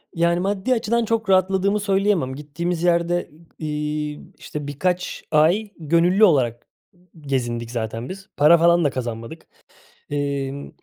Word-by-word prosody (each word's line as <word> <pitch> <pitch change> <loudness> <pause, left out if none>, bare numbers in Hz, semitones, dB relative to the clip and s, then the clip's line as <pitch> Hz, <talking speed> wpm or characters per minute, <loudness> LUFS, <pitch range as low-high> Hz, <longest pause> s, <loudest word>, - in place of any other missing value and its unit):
Yani, 170 +1 +2
maddi 195 +6 0
açıdan 235 0 0
çok 220 -2 -1
rahatladığımı 190 +2 +3
söyleyemem. 195 -9 +1
Gittiğimiz 165 +4 -4
yerde, 175 0 +1
ı 155 - -21 0.2
iii, 150 0 -3 0.2
işte, 150 -1 -7
birkaç 180 +5 -2
ay 175 +8 +3
gönüllü 170 +6 +3
olarak, 125 - +3 0.3
ımm, 180 0 -28 0.2
gezindik 120 -3 -2
zaten 115 0 -4
biz. 195 +1 -9
Para 150 +4 +7
falan 170 +1 +4
da 145 - +3
kazanmadık. 120 +3 -6 0.6
Emm, 140 -1 -3
170 Hz, 135 wpm, -22 LUFS, 140-190 Hz, 0.6 s, Para